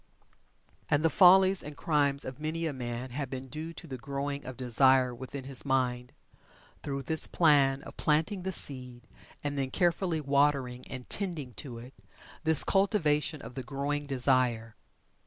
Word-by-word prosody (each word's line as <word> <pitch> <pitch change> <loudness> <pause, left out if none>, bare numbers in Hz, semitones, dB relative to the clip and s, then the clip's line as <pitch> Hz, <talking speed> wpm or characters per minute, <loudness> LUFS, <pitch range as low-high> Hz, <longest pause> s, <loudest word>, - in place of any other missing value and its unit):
And 150 +2 +2
the 165 - +3
follies 190 0 +6
and 150 -1 -9
crimes 140 -3 0
of 130 +2 -7
many 160 +2 -3
a 155 - -2
man 120 0 -5
have 140 +1 -4
been 130 0 -7
due 155 +3 -6
to 155 - -11
the 130 -5 -7
growing 140 +2 -4
of 130 -2 -8
desire 130 +1 +4
within 130 +3 -7
his 135 -1 -5
mind, 125 -2 -1 0.7
through 140 -1 -4
this 160 +2 0
plan 140 -4 +3
of - - -12
planting 160 +6 +1
the 190 +1 -3
seed, 125 -7 -5 0.4
and 145 -1 -2
then 135 -1 -1
carefully 175 +2 0
watering 140 -3 +1
and 125 -1 -8
tending 165 -11 -4
to 125 -6 -8
it 125 +3 -11 0.5
this 160 -2 +6
cultivation 155 -7 +1
of - - -9
the 130 - -5
growing 140 +2 -3
desire. 125 -4 +1
140 Hz, 160 wpm, -29 LUFS, 130-155 Hz, 0.7 s, follies